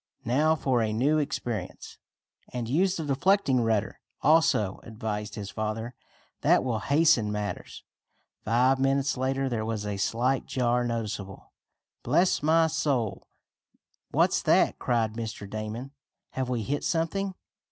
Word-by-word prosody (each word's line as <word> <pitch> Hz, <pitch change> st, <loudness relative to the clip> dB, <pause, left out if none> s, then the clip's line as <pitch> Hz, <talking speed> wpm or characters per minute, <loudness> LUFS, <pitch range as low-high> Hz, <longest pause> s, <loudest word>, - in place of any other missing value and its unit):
"Now 150 Hz, +7 st, +3 dB
for 130 Hz, -5 st, +1 dB
a 110 Hz, -1 st, 0 dB
new 140 Hz, +8 st, +2 dB
experience!" 120 Hz, -8 st, -4 dB, 0.5 s
"And 120 Hz, -2 st, -4 dB
use 180 Hz, +9 st, +2 dB
the 160 Hz, -, -3 dB
deflecting 145 Hz, -2 st, +2 dB
rudder, 110 Hz, -2 st, 0 dB, 0.2 s
also," 145 Hz, -11 st, +3 dB
advised 105 Hz, -2 st, -5 dB
his 100 Hz, -2 st, -6 dB
father. 110 Hz, +2 st, -3 dB, 0.5 s
"That -, -, +4 dB
will 120 Hz, -4 st, -1 dB
hasten 140 Hz, -7 st, +3 dB
matters." 105 Hz, -1 st, -5 dB, 0.6 s
Five 125 Hz, +4 st, +3 dB
minutes 135 Hz, +1 st, +1 dB
later 135 Hz, +1 st, -1 dB
there 115 Hz, -4 st, -2 dB
was 110 Hz, -1 st, -3 dB
a 105 Hz, -1 st, -3 dB
slight 125 Hz, +6 st, 0 dB
jar 125 Hz, -1 st, +1 dB
noticeable. 110 Hz, -5 st, -5 dB, 0.5 s
"Bless 180 Hz, +1 st, +2 dB
my 160 Hz, +2 st, +4 dB
soul! 140 Hz, -9 st, -1 dB, 0.8 s
What's -, -, +2 dB
that?" -, -, +3 dB
cried 115 Hz, -3 st, 0 dB
Mr. 110 Hz, -3 st, -6 dB
Damon. 110 Hz, +5 st, -5 dB, 0.4 s
"Have 130 Hz, -1 st, -3 dB
we 120 Hz, -3 st, -1 dB
hit 145 Hz, +7 st, -2 dB
something?" 185 Hz, +3 st, -1 dB
125 Hz, 130 wpm, -27 LUFS, 110-140 Hz, 0.8 s, That